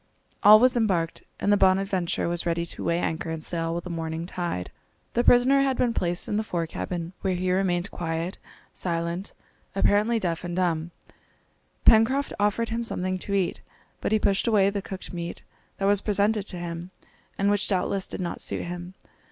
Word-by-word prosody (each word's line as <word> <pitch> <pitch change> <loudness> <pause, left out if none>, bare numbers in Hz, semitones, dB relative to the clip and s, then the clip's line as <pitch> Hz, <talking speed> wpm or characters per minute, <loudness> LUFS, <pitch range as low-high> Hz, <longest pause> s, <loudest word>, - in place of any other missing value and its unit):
All 210 +1 +9
was 250 +2 +4
embarked, 185 -8 0 0.2
and 205 - +3
the - - +4
Bonadventure 190 -2 +2
was 170 0 -1
ready 170 0 0
to - - -5
weigh 170 - +1
anchor 165 -1 -2
and 160 -1 -4
sail 165 0 -1
with 170 - -3
the 180 - -6
morning 165 0 -3
tide. 175 - -4 0.4
The 240 - +2
prisoner 255 +3 +5
had 270 -2 +1
been 240 -2 +2
placed 175 -3 0
in 205 - -1
the 215 - 0
fore 175 -5 -2
cabin, 170 +1 -5
where 190 -2 0
he 180 +1 0
remained 185 -1 0
quiet, 165 +1 -3 0.3
silent, 170 +2 -3 0.4
apparently 210 +4 +3
deaf 175 -6 -2
and 175 -1 -4
dumb. 170 -3 0 1.0
Pencroft 255 +6 +5
offered 210 +3 +1
him 230 +1 -2
something 185 -4 -2
to 200 +2 -3
eat, 190 -3 0 0.4
but - - -2
he 220 - +5
pushed 200 +1 +1
away 200 -3 +4
the 200 0 -2
cooked 190 -1 -7
meat 170 -1 -5 0.3
that 195 - -1
was 200 0 +3
presented 210 0 +1
to 180 - -6
him 170 0 -5 0.5
and 200 +1 +2
which 205 0 +1
doubtless 195 0 0
did - - -4
not 175 -1 -3
suit - - -2
him. 175 +1 -7
185 Hz, 185 wpm, -26 LUFS, 170-205 Hz, 1.0 s, All